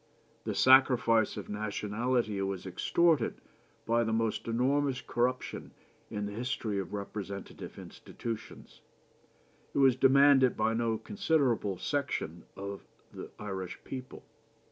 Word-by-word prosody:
The - - -2
sacrifice 125 -4 +5
of - - -6
nationality 105 +1 -1
was 95 -1 -3
extorted 150 - +1 0.5
by 115 +1 +2
the 110 - -1
most 110 0 -1
enormous 130 +3 +1
corruption 125 +2 -2 0.3
in 105 0 -3
the 100 - -5
history 110 -2 -2
of 95 - -5
representative 100 -1 -6
institutions. 115 -2 -8 0.9
It - - -1
was 135 -3 +5
demanded 135 0 +5
by 115 - +2
no 115 -1 0
considerable 140 - 0
section 135 - -3
of 100 0 -6 0.3
the - - -8
Irish 95 -3 -5
people. 130 -1 -8
115 Hz, 115 wpm, -31 LUFS, 105-130 Hz, 0.9 s, sacrifice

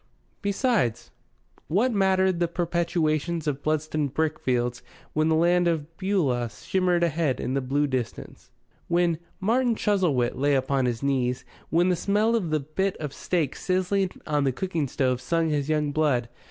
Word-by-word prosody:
Besides, 200 - 0 0.6
what 230 +9 +2
mattered 190 -2 +2
the 175 - +2
perpetuations 170 -2 -1
of 145 -2 -2
Bludston 155 -1 0
brickfields 125 -5 -1 0.3
when 155 +1 +2
the 160 - +3
Land 175 +2 +3
of 165 -1 -2
Beulah 150 - 0
shimmered 180 - 0
ahead 160 -4 0
in 130 - -2
the 135 - 0
blue 140 +3 +1
distance, 130 -5 -5 0.4
when 170 -2 +2 0.2
"Martin 235 +4 +2
Chuzzlewit" 175 - +1
lay 140 +2 +2
open 130 +1 -1
on 135 -2 +2
his 120 +1 -3
knees, 125 -3 0 0.2
when 175 +3 +3
the 180 - +3
smell 210 +6 +1
of 195 -8 -1
the 155 0 +1
bit 185 +7 -2
of 150 -3 -5
steak 165 -7 -1
sizzling 185 +1 0 0.2
on 150 -2 +1
the 135 - +2
cooking 165 +1 -2
stove 130 -1 0
stung 165 +5 0
his 145 -1 -1
young 150 -2 +1
blood? 140 -6 +1
155 Hz, 160 wpm, -26 LUFS, 140-180 Hz, 0.6 s, the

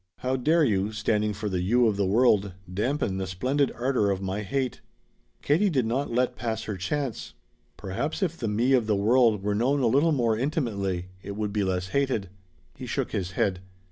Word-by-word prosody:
How 130 +1 0
dare 155 +6 +3
you 100 -5 +1
standing 105 0 0
for 105 +1 -4
the 95 -3 -1
You 120 +7 +3
of 110 -3 +2
the 100 -1 0
world 105 -2 +3 0.2
dampen 110 0 -1
the 95 - -3
splendid 130 +10 0
ardor 125 -4 +1
of 95 -1 0
my 95 +1 -3
hate?" 130 +4 -2 0.6
Katie 175 +8 +3
did 135 -8 +1
not 130 +5 -1
let 125 +1 +1
pass 110 -2 -3
her 105 - -4
chance. 95 - -3 0.4
"Perhaps 105 - -3
if 170 -3 -1
the 115 - -4
Me 115 +6 +2
of 120 -4 +3
the 105 - +2
world 110 0 +3
were 105 0 0
known 130 +7 +1
a - - +2
little 140 +8 +3
more 120 -6 +2
intimately 105 - -2
it 100 - -7
would 105 -1 -3
be 105 -1 +1
less 90 -1 -1
hated." 130 -7 0 0.4
He - - -8
shook - - -2
his 95 -2 -3
head. 95 -1 0
110 Hz, 200 wpm, -26 LUFS, 100-130 Hz, 0.6 s, dare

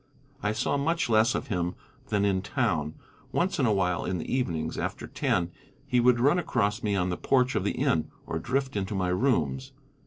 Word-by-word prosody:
I 105 - +1
saw 110 +6 0
much 165 +1 0
less 110 +1 +4
of - - -3
him 90 -3 -1 0.3
than 105 -2 +1
in 95 -2 +1
town. 90 - -1 0.4
Once 180 -1 0
in 130 - +3
a - - +3
while 90 -4 +1
in 90 - -2
the 85 - -3
evenings, 80 -11 -1
after - - -3
ten, 85 -1 0 0.3
he 125 - +2
would 120 0 +4
run 145 +8 +4
across 105 -11 0
me 105 -2 0
on 90 -1 0
the 90 - -2
porch 130 -1 +2
of - - 0
the - - 0
inn, 80 - +1 0.2
or 80 - -3
drift 130 +6 -1
into 100 +1 -2
my 95 -2 0
rooms. 90 - 0
105 Hz, 205 wpm, -28 LUFS, 90-125 Hz, 0.4 s, less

